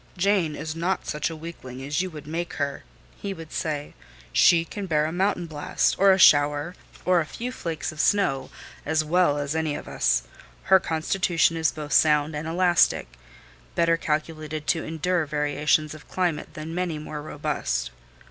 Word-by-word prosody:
"Jane 180 Hz, -4 st, +2 dB
is 155 Hz, +1 st, -5 dB
not 175 Hz, +3 st, -1 dB
such 150 Hz, +1 st, -2 dB
a 165 Hz, -, -6 dB
weakling 145 Hz, -6 st, -9 dB
as 145 Hz, +5 st, 0 dB
you 185 Hz, -, -3 dB
would 150 Hz, -3 st, -10 dB
make 165 Hz, +3 st, -4 dB
her," 140 Hz, -1 st, -3 dB, 0.3 s
he 200 Hz, -1 st, -5 dB
would 165 Hz, -2 st, -10 dB
say: 150 Hz, -2 st, -3 dB, 0.4 s
"she 165 Hz, -1 st, +5 dB
can 200 Hz, +3 st, -6 dB
bear 150 Hz, -3 st, +2 dB
a 155 Hz, -, -2 dB
mountain 180 Hz, 0 st, 0 dB
blast, 150 Hz, -3 st, 0 dB
or 195 Hz, 0 st, +7 dB
a 190 Hz, -, +4 dB
shower, 145 Hz, -1 st, +5 dB, 0.3 s
or 180 Hz, -1 st, +4 dB
a -, -, -3 dB
few 245 Hz, +8 st, -5 dB
flakes 165 Hz, -10 st, -4 dB
of 155 Hz, -, -12 dB
snow, 135 Hz, -11 st, +2 dB, 0.3 s
as 160 Hz, +1 st, +1 dB
well 165 Hz, -2 st, +3 dB
as 145 Hz, +1 st, -2 dB
any 160 Hz, -2 st, 0 dB
of -, -, -7 dB
us. -, -, +1 dB, 0.4 s
Her 190 Hz, -, +6 dB
constitution 165 Hz, 0 st, +1 dB
is 160 Hz, -1 st, +1 dB
both 150 Hz, -1 st, -6 dB
sound 150 Hz, 0 st, +4 dB
and 150 Hz, +2 st, -4 dB
elastic;—better 60 Hz, -, 0 dB
calculated 155 Hz, -1 st, -3 dB
to 160 Hz, 0 st, +1 dB
endure 165 Hz, +1 st, -1 dB
variations 150 Hz, +1 st, +1 dB
of 155 Hz, -, -13 dB
climate 175 Hz, -5 st, -2 dB
than 155 Hz, +1 st, -6 dB
many 175 Hz, -2 st, -2 dB
more 150 Hz, 0 st, -6 dB
robust." -, -, -2 dB
155 Hz, 170 wpm, -25 LUFS, 150-175 Hz, 0.4 s, or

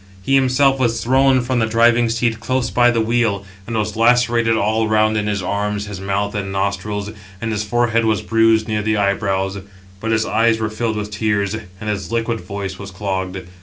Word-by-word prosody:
He 135 Hz, -, -1 dB
himself 135 Hz, 0 st, +3 dB
was 115 Hz, -3 st, 0 dB
thrown 130 Hz, +1 st, +3 dB
from 125 Hz, 0 st, -1 dB
the 110 Hz, -, +1 dB
driving 115 Hz, +1 st, +3 dB
seat 115 Hz, 0 st, 0 dB
close 130 Hz, +1 st, -1 dB
by 120 Hz, 0 st, +4 dB
the 120 Hz, -1 st, +1 dB
wheel, 110 Hz, -3 st, 0 dB, 0.2 s
and 115 Hz, -1 st, -2 dB
was 105 Hz, -1 st, -2 dB
lacerated 115 Hz, 0 st, +3 dB
all 110 Hz, +2 st, +1 dB
round 110 Hz, 0 st, +2 dB
in 105 Hz, -1 st, -1 dB
his 100 Hz, -2 st, -1 dB
arms, 105 Hz, +2 st, -2 dB
his 100 Hz, -2 st, -7 dB
mouth, 100 Hz, +1 st, -1 dB
and 100 Hz, -2 st, -3 dB
nostrils, 100 Hz, +1 st, -2 dB, 0.3 s
and 115 Hz, -1 st, -3 dB
his 105 Hz, -1 st, -1 dB
forehead 115 Hz, +1 st, +1 dB
was 110 Hz, -1 st, +1 dB
bruised 115 Hz, 0 st, +3 dB
near 110 Hz, -1 st, -1 dB
the 110 Hz, 0 st, 0 dB
eyebrows; 100 Hz, -1 st, 0 dB, 0.4 s
but 115 Hz, -, -4 dB
his 110 Hz, -1 st, +1 dB
eyes 115 Hz, 0 st, +2 dB
were 110 Hz, -1 st, -2 dB
filled 110 Hz, 0 st, -2 dB
with 105 Hz, 0 st, -4 dB
tears, 105 Hz, -2 st, 0 dB
and 105 Hz, -2 st, -8 dB
his 105 Hz, 0 st, -3 dB
liquid 115 Hz, -1 st, -1 dB
voice 100 Hz, -2 st, -6 dB
was 100 Hz, -1 st, -7 dB
clogged. 95 Hz, -1 st, -4 dB
110 Hz, 200 wpm, -19 LUFS, 100-115 Hz, 0.4 s, by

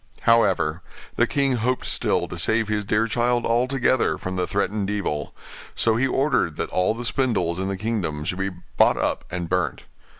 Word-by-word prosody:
However, 95 Hz, -8 st, +3 dB, 0.3 s
the -, -, +3 dB
king 135 Hz, -3 st, +1 dB
hoped 125 Hz, +3 st, -1 dB
still -, -, +1 dB
to -, -, -7 dB
save 110 Hz, -1 st, +2 dB
his 105 Hz, -1 st, -1 dB
dear 105 Hz, +2 st, +1 dB
child 120 Hz, +1 st, 0 dB
altogether 125 Hz, +2 st, +1 dB
from 95 Hz, 0 st, -5 dB
the 90 Hz, -1 st, -1 dB
threatened 100 Hz, 0 st, -1 dB
evil; 100 Hz, -8 st, -3 dB, 0.4 s
so 115 Hz, -1 st, +2 dB
he 130 Hz, +4 st, +2 dB
ordered 135 Hz, -, +1 dB
that -, -, -4 dB
all 90 Hz, +4 st, +1 dB
the 120 Hz, +1 st, -6 dB
spindles 100 Hz, -10 st, 0 dB
in 95 Hz, -, -2 dB
the 95 Hz, 0 st, -3 dB
kingdom 95 Hz, -8 st, -2 dB
should 90 Hz, +4 st, -3 dB
be 95 Hz, 0 st, 0 dB
bought 90 Hz, -2 st, +1 dB
up -, -, -1 dB
and 85 Hz, -1 st, -4 dB
burnt. 90 Hz, +1 st, -1 dB
105 Hz, 180 wpm, -23 LUFS, 90-120 Hz, 0.4 s, However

